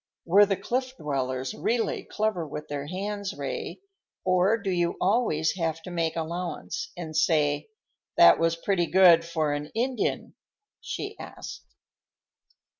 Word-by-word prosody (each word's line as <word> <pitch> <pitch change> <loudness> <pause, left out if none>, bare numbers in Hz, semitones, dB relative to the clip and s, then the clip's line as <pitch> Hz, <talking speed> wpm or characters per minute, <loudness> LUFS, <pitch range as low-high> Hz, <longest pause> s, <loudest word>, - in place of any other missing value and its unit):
"Were 200 +4 +6
the 195 -1 0
Cliff 255 +6 -2
Dwellers 130 - -2
really 230 +1 -1
clever 210 -6 -1
with 150 +1 -7
their 145 0 -4
hands, 200 +3 -4
Ray, - - -5 0.4
or 185 +4 +3
do 200 -3 -3
you 175 -1 0
always 190 -6 +1
have 165 -2 -1
to 180 - -8
make 165 -2 -1
allowance 175 - -4
and 160 -3 -6
say, 150 - +2 0.5
'That - - +8
was 165 0 +2
pretty 175 0 0
good 175 0 +6
for 160 -3 -1
an 145 0 -3
Indian'?" 250 +2 -1 0.5
she - - -5
asked. - - -9
175 Hz, 135 wpm, -27 LUFS, 155-200 Hz, 0.5 s, That